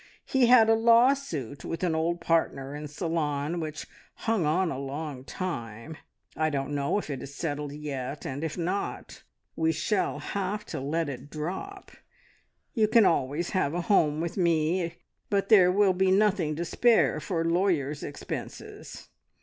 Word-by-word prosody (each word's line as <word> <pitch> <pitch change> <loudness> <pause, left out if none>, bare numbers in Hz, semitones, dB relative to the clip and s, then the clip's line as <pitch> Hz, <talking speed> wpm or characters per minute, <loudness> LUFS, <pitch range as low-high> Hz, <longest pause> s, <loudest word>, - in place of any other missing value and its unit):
He 260 -3 +3
had 235 -2 +7
a 225 - +5
lawsuit 230 - +2
with 165 - -4
an 175 -3 +1
old 165 +2 -1
partner 150 -5 0
in 150 0 -6
Ceylon, 150 0 -2
which 155 -2 -5 0.3
hung 220 -8 0
on 170 +3 +1
a 130 - -4
long 140 -1 -5
time. 135 - -5 0.4
I 155 0 +1
don't 140 -1 -2
know 140 +6 0
if 200 - -4
it 135 -3 -4
is 140 +1 -9
settled 145 -3 -3
yet; 145 -2 -5
and, 140 +3 -4
if 160 +1 -3
not, 180 +4 -3 0.3
we 160 0 +2
shall 185 +6 0
have 200 +1 -3
to - - -2
let 155 +4 -1
it 135 0 -7
drop. 190 - -6 0.8
You 220 -4 +3
can 225 -1 +5
always 150 +1 +1
have 175 -6 0
a 175 - 0
home 160 -6 +2
with 170 +3 -4
me; 170 0 +1 0.3
but 200 -1 0
there 185 -5 +7
will 195 0 +4
be 190 +1 +2
nothing 190 -5 +2
to 170 +3 -3
spare 235 +6 +3
for 165 -4 -2
lawyers' 165 -5 +1
expenses. 145 - -7
165 Hz, 160 wpm, -27 LUFS, 145-190 Hz, 0.8 s, had